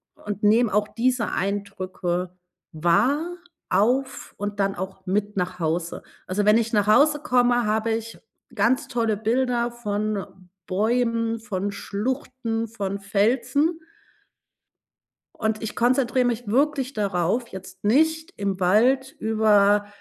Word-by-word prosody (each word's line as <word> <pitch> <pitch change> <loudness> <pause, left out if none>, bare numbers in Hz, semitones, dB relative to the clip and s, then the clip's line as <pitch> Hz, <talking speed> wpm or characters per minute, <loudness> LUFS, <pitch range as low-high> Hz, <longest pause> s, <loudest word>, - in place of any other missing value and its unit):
und 205 -1 -6
nehme 215 +1 +3
auch 210 0 +2
diese 245 0 0
Eindrücke 185 -2 -3 0.4
wahr, 245 - +1 0.3
auf 260 +5 0
und 205 0 -4
dann 195 0 +1
auch 190 +1 -7
mit 205 +1 -1
nach 180 0 -2
Hause. 165 +1 -2 0.2
Also, 200 +3 -1
wenn 210 +2 +6
ich 230 0 -1
nach 205 -1 +2
Hause 295 +6 +5
komme, 245 -4 +2
habe 220 +1 0
ich 225 0 -4 0.4
ganz 260 +3 +2
tolle 230 -4 0
Bilder 240 +2 0
von 210 -3 -2 0.4
Bäumen, 230 +3 0
von 205 -3 -3
Schluchten, 230 +2 -3
von 200 -3 -4
Felsen. 255 +11 +1 1.5
Und 220 0 -2
ich 220 - -4
konzentriere 250 +1 +2
mich 240 -1 -1
wirklich 275 +2 +1
darauf, 200 +2 -1
jetzt 190 +1 -11
nicht 320 - +2
im 195 -1 -2
Wald 255 +9 +3
über 210 -2 +3
220 Hz, 125 wpm, -24 LUFS, 200-245 Hz, 1.5 s, wenn